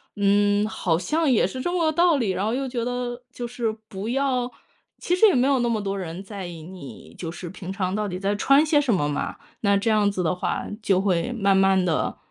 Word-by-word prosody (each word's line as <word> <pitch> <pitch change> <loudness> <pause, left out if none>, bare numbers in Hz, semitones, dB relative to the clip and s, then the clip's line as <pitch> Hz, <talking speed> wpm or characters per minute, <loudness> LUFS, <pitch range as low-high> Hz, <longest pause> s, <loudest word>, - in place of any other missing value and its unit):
嗯， 205 +1 +3
好 185 -6 0
像 305 - 0
也 225 - +4
是 255 +7 -6
这 350 - -1
么 350 -2 +1
个 315 - +3
道 340 -1 +3
理， 220 -7 0
然 190 - -2
后 225 - 0
又 270 +1 -1
觉 245 -2 -3
得， 245 0 -3
就 240 -1 -5
是 230 -2 -3
不 200 +3 -5
要 255 -2 0 0.5
其 355 - 0
实 440 +4 +6
也 380 - +3
没 255 +1 +3
有 275 -2 +3
那 240 - +1
么 225 -2 0
多 200 -1 -3
人 180 -1 -5
在 195 -2 -7
意 165 -2 -9
你， 160 - -11
就 165 -2 -5
是 175 +1 -8
平 190 -1 -7
常 190 -1 -2
到 210 0 -1
底 180 -2 -4
在 200 +2 0
穿 275 +8 +4
些 300 -2 +3
什 250 -6 +1
么 145 -6 +1
嘛。 145 - -3 0.2
那 200 -1 +3
这 210 +3 0
样 210 -2 +3
子 185 -2 -2
的 165 - +1
话， 180 - -2 0.2
就 195 -3 +2
会 195 +4 0
慢 200 -4 +2
慢 190 -1 +4
地 165 -3 -1
205 Hz, 265 characters per minute, -24 LUFS, 190-250 Hz, 0.5 s, 实